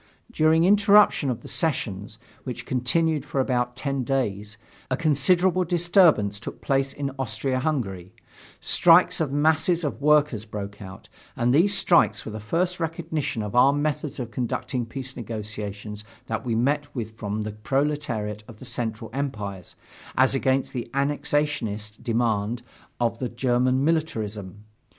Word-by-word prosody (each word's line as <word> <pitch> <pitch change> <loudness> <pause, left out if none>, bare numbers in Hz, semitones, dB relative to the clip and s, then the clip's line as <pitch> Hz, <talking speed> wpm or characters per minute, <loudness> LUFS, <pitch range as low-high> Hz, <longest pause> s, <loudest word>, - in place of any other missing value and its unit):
During 160 -4 +3
interruption 200 -5 +5
of 120 - -3
the - - -11
sessions, 105 - -2 0.3
which 120 -2 -6
continued 150 +4 0
for 145 -1 -3
about 125 -2 0
ten 135 0 -2
days, 105 -5 -2 0.3
a 130 - 0
considerable 175 +5 +3
disturbance 170 - +3
took 120 - -8
place 135 0 0
in 140 -1 -4
Austria 130 +1 -1
Hungary; 100 - -3 0.4
strikes 175 0 +4
of 150 -4 0
masses 160 +4 +2
of 145 -1 -3
workers 150 -6 +3
broke 100 -2 -7
out, 95 -1 -10 0.3
and 120 +1 +1
these 190 +8 +4
strikes 120 - +3
were 110 - -5
the 110 - -6
first 175 - -1
recognition 160 -7 -3
of 105 - -5
our 125 +3 +6
methods 145 -1 -2
of 120 -2 -5
conducting 120 +1 -3
peace 130 +1 -6
negotiations 105 -2 -6 0.2
that 115 -1 -3
we 120 -3 -1
met 145 +6 0
with 110 -3 -4
from 110 -1 -4
the 105 - -4
proletariat 115 -3 -2
of 110 - -12
the 130 - -11
Central 115 -2 -4
Empires, 105 - -4 0.4
as 130 +1 +4
against 135 0 0
the 120 -2 -4
annexationist 140 -7 -1
demands 115 -1 0 0.4
of 115 -1 0
the 125 - -2
German 125 +2 +1
militarism. 105 - -2
130 Hz, 145 wpm, -25 LUFS, 110-150 Hz, 0.4 s, our